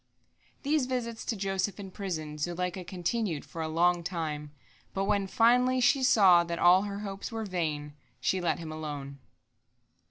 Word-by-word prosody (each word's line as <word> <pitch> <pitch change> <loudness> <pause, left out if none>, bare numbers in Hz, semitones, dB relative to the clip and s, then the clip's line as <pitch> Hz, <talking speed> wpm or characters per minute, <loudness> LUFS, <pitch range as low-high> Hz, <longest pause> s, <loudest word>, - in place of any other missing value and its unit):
These 290 -2 +1
visits 235 -3 -3
to 230 - -1
Joseph 195 0 -2
in 195 -2 -7
prison 155 -6 -5
Zuleika 180 +3 -2
continued 180 -1 -2
for 165 - -7
a 160 - -2
long 170 +2 +2
time, 155 -4 -4 0.4
but 195 - 0
when, 200 -1 +1
finally, 250 +5 +4
she 265 +2 +4
saw 195 -9 +6
that 170 0 -4
all 180 +2 +6
her 200 0 -4
hopes 195 +2 -6
were 225 -1 -3
vain, 155 -6 -3 0.3
she 185 +8 0
let 175 - +1
him 160 -2 -7
alone. 145 -3 -6
185 Hz, 160 wpm, -29 LUFS, 165-210 Hz, 0.4 s, saw